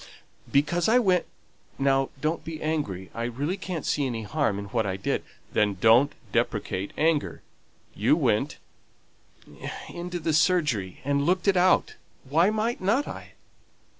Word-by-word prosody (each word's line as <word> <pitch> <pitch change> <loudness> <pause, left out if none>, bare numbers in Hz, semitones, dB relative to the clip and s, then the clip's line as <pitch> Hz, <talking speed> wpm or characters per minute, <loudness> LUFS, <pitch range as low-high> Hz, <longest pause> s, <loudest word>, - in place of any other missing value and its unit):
"Because 170 +7 +2
I 240 - +5
went 185 -7 +2 0.5
now 135 0 +2
don't 155 +2 -1
be 160 0 -6
angry, 145 - -3
I 115 0 -3
really 140 +9 -2
can't 185 -5 -5
see 145 -2 +1
any 115 -3 -4
harm 125 -2 0
in 100 - -5
what 115 -2 0
I 95 -2 -2
did 95 - -1 0.2
" - - -31
"Then, 105 -2 +2
don't 115 +7 +5 0.2
deprecate 95 +2 -1
anger. 155 -1 +1 0.5
You - - +3
went - - +1 0.7
" - - -10
"Into 175 +1 -4
the 165 -1 -1
surgery, 150 - +1
and 140 0 +1
looked 185 +2 +1
it 195 - +5
out. 180 +1 +3 0.3
Why 165 +8 +4
might 220 +2 -1
not 225 +10 +1
I?" - - -8
150 Hz, 155 wpm, -26 LUFS, 120-180 Hz, 0.7 s, I